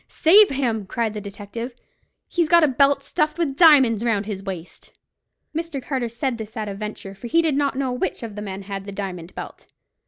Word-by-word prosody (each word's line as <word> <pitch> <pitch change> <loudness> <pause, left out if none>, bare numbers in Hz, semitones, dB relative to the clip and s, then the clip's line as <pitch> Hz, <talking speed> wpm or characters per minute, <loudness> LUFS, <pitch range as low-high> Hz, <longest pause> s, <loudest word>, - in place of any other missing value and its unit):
"Save 400 +6 +6
him!" 235 -7 -1
cried 225 +1 -1
the 210 - -5
detective. 205 +4 -7 0.5
"He's 340 -3 0
got 340 0 +6
a - - +6
belt 275 +1 +3
stuffed 305 +2 -1
with 315 -6 -1
diamonds 270 - +6
round 215 -4 +1
his 200 -2 -5
waist!" 185 -3 -8 0.6
Mr. 325 -3 -3
Carter 255 -2 -2
said 235 +1 -2
this 220 0 -8
at 215 -1 -3
a 200 - -4
venture, 200 -1 -7
for 200 +5 -9
he 330 +7 +3
did 310 -4 +1
not 280 -1 0
know 265 -2 0
which 250 -1 -3
of 225 -2 -6
the 210 - -5
men 195 -1 -6
had 195 0 -6
the - - -5
diamond 185 -3 -6
belt. - - -9
235 Hz, 210 wpm, -23 LUFS, 205-280 Hz, 0.6 s, Save